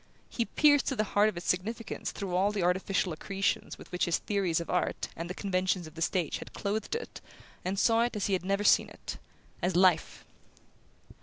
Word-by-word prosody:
He 235 - 0
pierced 290 +1 +4
to 265 - 0
the 215 - +1
heart 210 +1 +3
of 200 - -7
its 175 - -6
significance 220 +6 -2
through 190 -3 -4
all 195 +3 +3
the 205 -3 -1
artificial 185 0 +1
accretions 200 +6 -2
with - - -13
which 180 - +1
his 170 - +2
theories 190 -6 0
of 170 - -5
art 180 - -1
and 165 +1 -5
the 180 - -4
conventions 185 -2 0
of 155 - -11
the 165 - -9
stage 175 -2 0
had - - -10
clothed 215 - -2
it, 465 - -6 0.4
and 185 +2 -2
saw 225 +3 +4
it 240 0 0
as 205 - -1
he 200 - 0
had 185 - 0
never 200 +2 0
seen - - +5
it: - - -8 0.4
as 180 0 0
life. 180 -3 +3
195 Hz, 210 wpm, -30 LUFS, 180-210 Hz, 0.4 s, seen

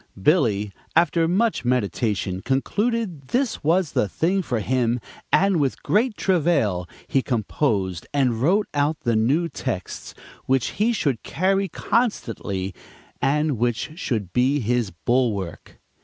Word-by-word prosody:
Billy, 105 - +2 0.2
after 165 0 +3
much 210 - +1
meditation, 100 -5 0
concluded 185 - -1
this 255 - -1
was 165 +1 +2
the 105 - +1
thing 185 - +1
for 125 -9 -2
him, 125 +1 +1 0.3
and 195 -3 +4
with 140 -3 -1
great 215 +2 +1
travail 145 - +1 0.2
he 135 - +2
composed 105 - -1
and 125 -5 +1
wrote 195 +9 +3
out 145 +2 +1
the 120 -1 +1
new 135 +10 +2
texts 130 - -5 0.3
which 130 -1 +2
he 230 +3 +4
should 140 - 0
carry 195 +4 0
constantly 110 - -1 0.5
and 150 -2 +1
which 120 +5 -1
should 115 - -3
be 130 +4 +2
his 120 -2 0
bulwark. 100 +1 -2
135 Hz, 125 wpm, -23 LUFS, 110-175 Hz, 0.5 s, and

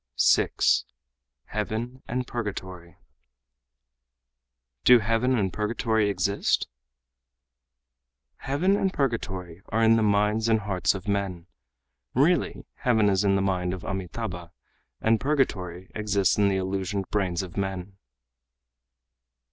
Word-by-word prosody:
6. - - +3 0.6
Heaven 120 +4 -4
and 125 +1 -2
Purgatory 95 -7 -6 1.9
"Do 125 - +8
heaven 115 +3 +1
and 95 -4 0
purgatory 110 0 0
exist?" 100 0 0 1.7
"Heaven 170 +9 +1
and 195 -2 +1
purgatory 95 - -3
are 115 +2 +1
in 115 0 +5
the - - +2
minds 105 +2 +2
and 110 -1 +3
hearts 95 -2 0
of 95 +2 -8
men. 100 -4 -2 0.7
Really 160 +7 +2
heaven 110 -5 +3
is 95 0 +2
in 100 -1 +3
the 95 - +1
mind 90 -2 0
of 95 - -11
Amitâbha 95 -2 -5 0.5
and 110 0 +3
purgatory 95 - -1
exists 105 -3 +1
in 100 -1 +3
the 95 - +1
illusioned 95 +1 -2
brains 95 -3 0
of 90 - -9
men." 95 0 -4
100 Hz, 115 wpm, -26 LUFS, 95-115 Hz, 1.9 s, Do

